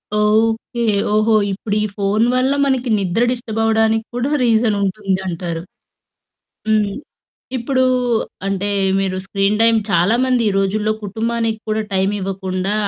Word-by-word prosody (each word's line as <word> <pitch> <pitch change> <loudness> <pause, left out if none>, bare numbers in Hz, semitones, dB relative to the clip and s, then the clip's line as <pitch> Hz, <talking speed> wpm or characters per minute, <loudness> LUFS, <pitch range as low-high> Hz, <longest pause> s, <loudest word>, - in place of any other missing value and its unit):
Okay. 225 +3 +1 0.3
ఓహో! 215 +1 +3 0.2
ఇప్పుడు 205 +2 -3
ఈ - - +1
ఫోన్ 205 +2 +1
వల్ల 255 +1 +2
మనకి 260 -2 0
నిద్ర 195 +4 0
డిస్టర్బ్ 235 -3 -4
అవ్వడానిక్కూడా 225 +3 +1
రీజన్ 225 -2 +2
ఉంటుందంటారు. 185 -4 -2 1.1
హ్మ్. 215 -2 +2 0.7
ఇప్పుడు 260 +2 +1 0.6
అంటే 195 +1 -1 0.3
మీరు 190 -1 -1
స్క్రీన్ 195 +2 0
టైమ్ 230 0 +5
చాలామంది 235 +8 +2
ఈ - - +1
రోజుల్లో 210 +2 0
కుటుంబానికి 225 +2 -2
కూడా 215 0 0
టైం 190 +1 +2
ఇవ్వకుండా 190 0 -2
215 Hz, 115 wpm, -18 LUFS, 195-230 Hz, 1.1 s, టైమ్